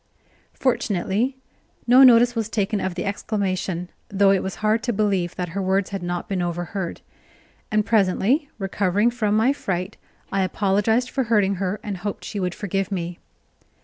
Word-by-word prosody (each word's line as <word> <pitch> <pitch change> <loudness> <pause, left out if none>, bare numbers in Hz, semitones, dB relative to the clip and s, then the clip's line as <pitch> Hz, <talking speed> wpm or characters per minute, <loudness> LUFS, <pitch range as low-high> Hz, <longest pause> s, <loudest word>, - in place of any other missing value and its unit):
Fortunately, 235 0 0 0.5
no 250 +2 +7
notice 245 -1 +7
was 225 -2 -2
taken 210 -1 0
of 190 -2 -2
the 180 - -3
exclamation, 190 -3 -2 0.2
though 195 0 +4
it 195 -2 +2
was 190 - -4
hard 215 +1 +3
to 245 - -1
believe 195 -5 0
that 180 -1 -3
her 195 +4 -3
words 190 +1 0
had 195 -2 -4
not 175 0 -3
been 190 -2 -1
overheard; 175 +1 -3 0.7
and 215 -1 +1
presently, 225 - +2
recovering 200 +2 +1
from 215 -3 0
my 240 +5 +3
fright, 190 -6 -3 0.3
I 195 - +1
apologized 205 +6 +1
for 265 -2 0
hurting 205 -4 +2
her, 195 +2 -1
and 205 -2 -4
hoped 205 +3 -5
she 205 - -4
would 180 -2 -2
forgive 195 0 -2
me. 175 -2 -4
200 Hz, 165 wpm, -23 LUFS, 185-220 Hz, 0.7 s, no